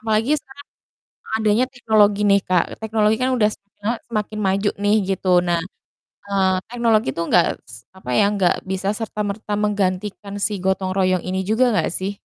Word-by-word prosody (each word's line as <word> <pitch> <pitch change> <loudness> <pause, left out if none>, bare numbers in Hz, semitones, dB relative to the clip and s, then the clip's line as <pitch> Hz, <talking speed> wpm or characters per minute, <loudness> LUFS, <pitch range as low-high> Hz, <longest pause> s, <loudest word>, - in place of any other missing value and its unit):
Apalagi 225 +5 +1
sekarang 285 +2 -15 0.7
adanya 220 +3 +2
teknologi 215 -5 +2
nih 200 0 +5
Kak, 180 -2 +3 0.2
teknologi 220 0 +2
kan 260 +1 +1
udah 215 -4 +3
semakin 200 -1 -13
lama 230 +3 0
semakin 215 -1 -3
maju 195 +2 +1
nih, 205 +1 +4 0.2
gitu. 190 - -6 0.2
Nah, 170 -1 +2 0.7
eee, 190 -2 +2
teknologi 230 - +1
itu 170 - -2
enggak 175 - +4 0.2
s 115 - -7 0.2
apa 190 -9 -8
ya, - - +5
enggak 190 -4 +2 0.2
bisa 190 +1 -2
serta 220 -1 -5
merta 210 +1 -5
menggantikan 200 0 -2
si - - +1
gotong 190 0 0
royong 185 -2 +2
ini 190 +1 -1
juga 220 +5 +3
enggak 210 - +1
sih? 190 +2 -2
205 Hz, 170 wpm, -21 LUFS, 190-220 Hz, 0.7 s, nih